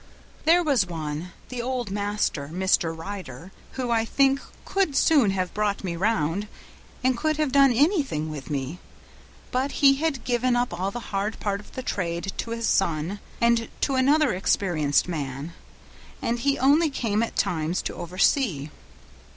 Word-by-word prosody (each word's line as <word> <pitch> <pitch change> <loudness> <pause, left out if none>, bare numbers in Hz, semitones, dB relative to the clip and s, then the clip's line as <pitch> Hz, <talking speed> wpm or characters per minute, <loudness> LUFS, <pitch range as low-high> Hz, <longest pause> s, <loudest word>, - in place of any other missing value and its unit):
"There 345 +3 +5
was 265 - +2
one 160 0 -5 0.2
the 250 -2 -4
old 245 -4 -3
master, 205 -8 -1
Mr. 180 -2 +2
Ryder 175 -3 -7 0.2
who, 255 -2 -2
I 225 -1 +3
think, 270 +3 +2 0.3
could 385 -8 0
soon 275 -6 +4
have 185 -2 -1
brought 205 -1 -1
me 175 -3 -2
round, 195 0 0 0.6
and 260 0 +3
could 310 +4 0
have 305 -3 0
done 275 -1 +6
anything 265 - +1
with 145 -3 -7
me; 140 +4 -3 0.7
but 265 +2 0
he 275 -2 +5
had 300 -4 -1
given 245 0 +1
up 245 -5 0
all 185 +3 -1
the 240 +3 -7
hard 200 +2 -1
part 200 -1 -1
of 205 - -15
the 260 - -5
trade 175 -3 -2
to - - -3
his 230 0 -2
son 170 +1 0 0.2
and 235 -1 +3
to 275 - +1
another 280 +1 +3
experienced 175 -6 +1
man, 145 -1 -4 0.7
and 235 +1 -1
he 275 +3 +1
only 295 +5 +4
came 225 -6 -1
at 230 - -2
times 165 +1 0
to - - -3
oversee. 175 - 0
210 Hz, 160 wpm, -25 LUFS, 175-260 Hz, 0.7 s, done